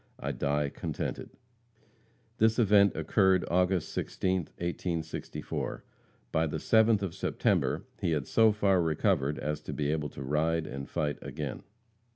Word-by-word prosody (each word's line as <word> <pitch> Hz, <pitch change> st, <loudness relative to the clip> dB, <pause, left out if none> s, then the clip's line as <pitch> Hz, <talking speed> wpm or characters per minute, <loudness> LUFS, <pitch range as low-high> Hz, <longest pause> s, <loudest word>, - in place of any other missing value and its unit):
I -, -, -2 dB
die 75 Hz, 0 st, 0 dB
contented." -, -, -4 dB, 1.1 s
This 110 Hz, 0 st, +4 dB
event 100 Hz, -3 st, +5 dB
occurred 95 Hz, -3 st, +3 dB
August 90 Hz, -1 st, +1 dB
16th, 95 Hz, -3 st, -1 dB
1864. 85 Hz, -2 st, -4 dB, 0.5 s
By 80 Hz, 0 st, +2 dB
the 75 Hz, -, -3 dB
7th 110 Hz, -2 st, +3 dB
of 90 Hz, -4 st, -3 dB
September -, -, 0 dB
he -, -, 0 dB
had 75 Hz, -4 st, -1 dB
so 110 Hz, -, +4 dB
far 100 Hz, -3 st, +2 dB
recovered 80 Hz, -3 st, +1 dB
as 75 Hz, 0 st, -3 dB
to -, -, -6 dB
be 75 Hz, -1 st, -1 dB
able 75 Hz, -1 st, -1 dB
to 70 Hz, -, -8 dB
ride 80 Hz, +4 st, 0 dB
and 70 Hz, -1 st, -6 dB
fight 75 Hz, -3 st, -2 dB
again. -, -, -5 dB
85 Hz, 140 wpm, -30 LUFS, 75-95 Hz, 1.1 s, event